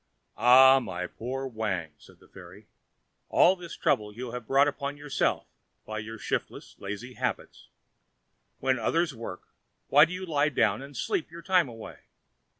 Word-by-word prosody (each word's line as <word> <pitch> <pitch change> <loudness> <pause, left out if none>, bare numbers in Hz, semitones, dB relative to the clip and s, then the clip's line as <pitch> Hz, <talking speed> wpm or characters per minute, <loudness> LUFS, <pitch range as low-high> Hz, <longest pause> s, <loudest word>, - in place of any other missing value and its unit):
"Ah, 130 +2 +7
my 90 -7 -5
poor 130 +8 -5
Wang," 105 - -3
said - - -19
the - - -20
fairy, 95 +3 -14 0.6
"all 185 - +5
this 175 -2 -9
trouble 105 -1 +1
you 120 +3 -7
have 125 -2 -7
brought 140 +2 +4
upon 140 0 -4
yourself 145 -1 -1 0.4
by 110 0 -5
your 110 +2 -7
shiftless, - - -4
lazy 105 +6 -6
habits. - - -4 0.9
When 130 -1 0
others 165 +7 0
work, 115 -6 -8 0.4
why 145 +2 +7
do 170 - -7
you 185 +1 -5
lie 150 -3 +1
down 135 -1 +1
and 140 -1 -10
sleep 155 - -2
your 170 +1 -11
time 180 -7 +3
away? 115 -1 -10
130 Hz, 155 wpm, -28 LUFS, 110-145 Hz, 0.9 s, Ah